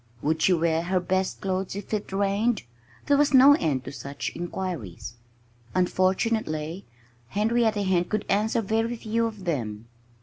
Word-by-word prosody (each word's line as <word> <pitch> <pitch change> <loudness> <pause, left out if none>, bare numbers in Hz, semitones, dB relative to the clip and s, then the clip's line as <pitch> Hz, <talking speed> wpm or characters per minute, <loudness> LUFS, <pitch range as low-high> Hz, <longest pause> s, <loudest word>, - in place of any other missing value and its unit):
Would 155 +2 0
she 190 - +4
wear 165 -1 +1
her 180 +2 0
best 185 +1 -1
clothes 190 -1 -2
if 200 +2 -7
it 210 -2 -2
rained? 200 +4 +1 0.4
There 285 - +4
was 285 -1 +3
no 270 +2 +9
end 150 - 0
to 135 - -6
such 140 0 -5
inquiries. 170 - -5 0.6
Unfortunately, 185 -2 0 0.4
Henrietta 220 - +1
Hen 180 -2 +2
could 215 +3 -2
answer 220 +3 +1
very 225 +3 0
few 230 0 -1
of 210 -4 -8
them. 115 -10 -3
190 Hz, 145 wpm, -26 LUFS, 165-220 Hz, 0.6 s, no